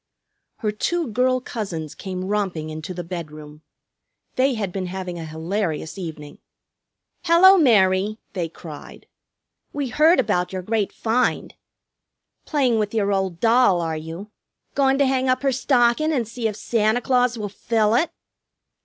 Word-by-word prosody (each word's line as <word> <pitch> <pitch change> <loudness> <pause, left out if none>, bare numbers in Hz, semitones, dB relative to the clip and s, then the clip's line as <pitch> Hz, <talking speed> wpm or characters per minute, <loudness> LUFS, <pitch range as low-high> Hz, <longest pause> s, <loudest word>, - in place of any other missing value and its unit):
Her 215 -3 0
two 330 +8 -1
girl 255 +3 +2
cousins 185 - -5
came 185 -1 -5
romping 190 -6 -2
into 155 +3 -6
the 175 -1 -5
bedroom. 155 -3 -8 0.7
They 260 0 +2
had 200 -4 -3
been 185 0 -4
having 180 -1 -5
a 165 - -6
hilarious 160 0 -3
evening. 160 -6 -8 0.9
"Hello, 360 +3 +7
Mary!" 210 - +3 0.2
they 175 -4 -2
cried. 155 -2 -11 0.7
"We 285 -3 -2
heard 315 +6 +4
about 180 -7 0
your 185 -1 -4
great 215 0 -1
find!" 240 +2 0 0.9
"Playing 260 -7 +1
with 210 +1 -2
your 205 -2 +1
old 190 -3 -1
doll, 230 -5 +4
are 165 -1 -2
you? 165 +6 -8 0.4
Goin' 270 -1 +2
to 280 - +3
hang 260 -1 +1
up 255 +2 +1
her 275 - +3
stockin' 255 +3 +2
and 250 -7 0
see 230 0 -3
if 210 - -4
Santa 220 +1 +1
Claus 250 -1 +1
will 210 -2 -3
fill 215 +1 0
it?" 315 +8 +2
210 Hz, 150 wpm, -22 LUFS, 180-250 Hz, 0.9 s, Hello